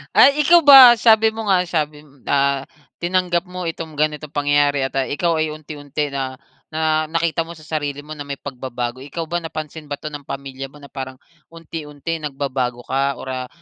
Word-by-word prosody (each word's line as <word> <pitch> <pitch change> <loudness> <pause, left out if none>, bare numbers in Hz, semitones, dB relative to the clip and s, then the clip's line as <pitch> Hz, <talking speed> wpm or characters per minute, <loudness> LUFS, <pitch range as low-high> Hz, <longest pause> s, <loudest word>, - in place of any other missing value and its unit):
Ay, 280 +2 +7
ikaw 345 0 +7
ba? 270 -4 +11
Sabi 220 -1 +5
mo 220 -1 -5
nga 185 -2 +4
sabi 150 -3 -2
mo 140 -2 -23
ah, 140 -1 +2 0.4
tinanggap 175 -1 +1
mo 180 -1 -5
itong 165 -1 -5
ganitong 150 0 -1
pangyayari 145 -1 +2
at, 135 - -5
ah, 135 -1 +1
ikaw 165 +3 0
ay 155 -1 0
unti-unti 150 -1 -5
na 135 -1 -3 0.4
na 155 0 +1
nakita 165 0 0
mo 170 - -9
sa 155 - -15
sarili 145 -2 -3
mo 155 +1 -9
na 145 - -6
may 140 0 -4
pagbabago. 125 -2 -5
Ikaw 145 +5 -5
ba 175 - 0
napansin 155 -2 -7
ba 145 - -3
'to 155 - -4
ng 145 -1 -8
pamilya 135 -1 -6
mo 145 +2 -17
na 140 - -12
parang 130 -1 -6 0.3
unti-unti 165 -1 -6
nagbabago 135 -4 -3
ka 135 +2 0
or, - - -8
ah, 130 -1 -4
150 Hz, 195 wpm, -20 LUFS, 140-165 Hz, 0.4 s, ba